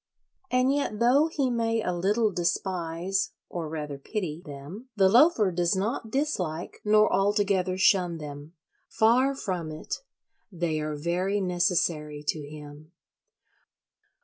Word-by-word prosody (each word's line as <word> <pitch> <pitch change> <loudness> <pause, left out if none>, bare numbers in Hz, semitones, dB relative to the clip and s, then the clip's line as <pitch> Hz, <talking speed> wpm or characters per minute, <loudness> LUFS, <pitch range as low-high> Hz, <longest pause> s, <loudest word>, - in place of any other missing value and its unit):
And 255 +2 +3
yet 280 -7 -1
though 260 +6 +4
he 280 -5 -1
may 230 -1 0
a 180 - -1
little 205 +5 +1
despise 180 +2 -1 0.2
(or 165 -3 -4
rather 150 -3 -5
pity) 170 -1 -4
them, 150 - -9
the 195 -3 +5
Loafer 230 - +5
does 175 +1 +1
not 220 +4 -2
dislike 185 - -2
nor 215 0 +4
altogether 195 -2 +1
shun 180 -3 +3
them. 145 +1 -9 0.4
Far 255 +5 +3
from 180 -10 -3
it: 155 - -5 0.5
they 170 -3 -1
are 150 0 -3
very 180 +6 -1
necessary 175 -5 0
to 155 - -1
him. 150 +1 -11
185 Hz, 125 wpm, -27 LUFS, 160-215 Hz, 0.5 s, the